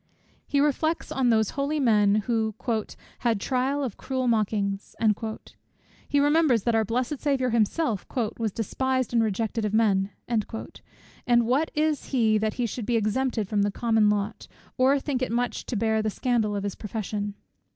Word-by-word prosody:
He 285 Hz, -, +1 dB
reflects 305 Hz, +3 st, 0 dB
on 260 Hz, -2 st, +1 dB
those 220 Hz, -3 st, +3 dB
holy 285 Hz, +2 st, -1 dB
men 210 Hz, -5 st, +3 dB
who 220 Hz, -3 st, 0 dB, 0.6 s
"had 230 Hz, -4 st, +1 dB
trial 265 Hz, +5 st, 0 dB
of 245 Hz, -7 st, -4 dB
cruel 260 Hz, -2 st, -2 dB
mockings;" 205 Hz, -3 st, 0 dB, 1.1 s
he 285 Hz, -, +3 dB
remembers 290 Hz, -6 st, +3 dB
that 235 Hz, -, +1 dB
our 225 Hz, 0 st, +3 dB
blessed 250 Hz, +6 st, -2 dB
Saviour 270 Hz, -4 st, 0 dB
himself 230 Hz, -, 0 dB, 0.3 s
"was 225 Hz, -2 st, 0 dB
despised 260 Hz, +4 st, -1 dB
and 230 Hz, -, +4 dB
rejected 220 Hz, +1 st, -1 dB
of 210 Hz, 0 st, 0 dB
men;" 200 Hz, -3 st, +3 dB, 0.2 s
and 225 Hz, -4 st, 0 dB, 1.0 s
what 275 Hz, +7 st, +1 dB
is 305 Hz, -1 st, +1 dB
he, 220 Hz, -5 st, +2 dB
that 215 Hz, 0 st, -1 dB
he 245 Hz, -, 0 dB
should 230 Hz, -1 st, -5 dB
be 240 Hz, -, +1 dB
exempted 220 Hz, 0 st, 0 dB
from 205 Hz, 0 st, 0 dB
the 205 Hz, -, +2 dB
common 220 Hz, 0 st, +2 dB
lot, 210 Hz, +1 st, -2 dB, 0.3 s
or 270 Hz, +2 st, +3 dB
think 270 Hz, -2 st, -2 dB
it 255 Hz, -, -1 dB
much 240 Hz, -1 st, -2 dB
to -, -, -3 dB
bear 220 Hz, 0 st, +1 dB
the 215 Hz, -, 0 dB
scandal 220 Hz, -2 st, 0 dB
of 200 Hz, -, -2 dB
his 200 Hz, -1 st, -2 dB
profession? 205 Hz, -1 st, -4 dB
230 Hz, 165 wpm, -26 LUFS, 210-260 Hz, 1.1 s, and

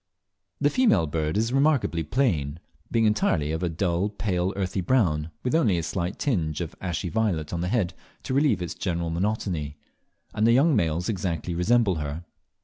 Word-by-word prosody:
The 145 Hz, 0 st, +2 dB
female 250 Hz, -, +3 dB
bird 80 Hz, +2 st, -1 dB
is 115 Hz, +3 st, 0 dB
remarkably 135 Hz, -, +2 dB
plain, 80 Hz, -, 0 dB, 0.3 s
being 115 Hz, -1 st, +2 dB
entirely 85 Hz, -8 st, +1 dB
of 80 Hz, +1 st, -2 dB
a 90 Hz, -, 0 dB
dull 90 Hz, +3 st, 0 dB
pale 95 Hz, -3 st, -1 dB
earthy 95 Hz, -1 st, -1 dB
brown, 85 Hz, -8 st, +1 dB
with 125 Hz, -, -1 dB
only 115 Hz, -, +3 dB
a 85 Hz, -, -1 dB
slight 85 Hz, +3 st, -3 dB
tinge 85 Hz, -, -1 dB
of 85 Hz, -3 st, -4 dB
ashy 90 Hz, 0 st, -2 dB
violet 85 Hz, -4 st, -1 dB
on 85 Hz, -, -2 dB
the 90 Hz, -, -1 dB
head 95 Hz, -5 st, 0 dB, 0.3 s
to -, -, -3 dB
relieve 135 Hz, -9 st, +2 dB
its 85 Hz, -, -4 dB
general 85 Hz, -2 st, -2 dB
monotony; 85 Hz, -5 st, -2 dB, 0.6 s
and 110 Hz, +2 st, +2 dB
the 115 Hz, -, +5 dB
young 140 Hz, +4 st, +4 dB
males 85 Hz, -3 st, 0 dB
exactly 90 Hz, -4 st, -2 dB
resemble 95 Hz, +2 st, +2 dB
her. 75 Hz, +2 st, -4 dB
90 Hz, 175 wpm, -26 LUFS, 80-110 Hz, 0.6 s, the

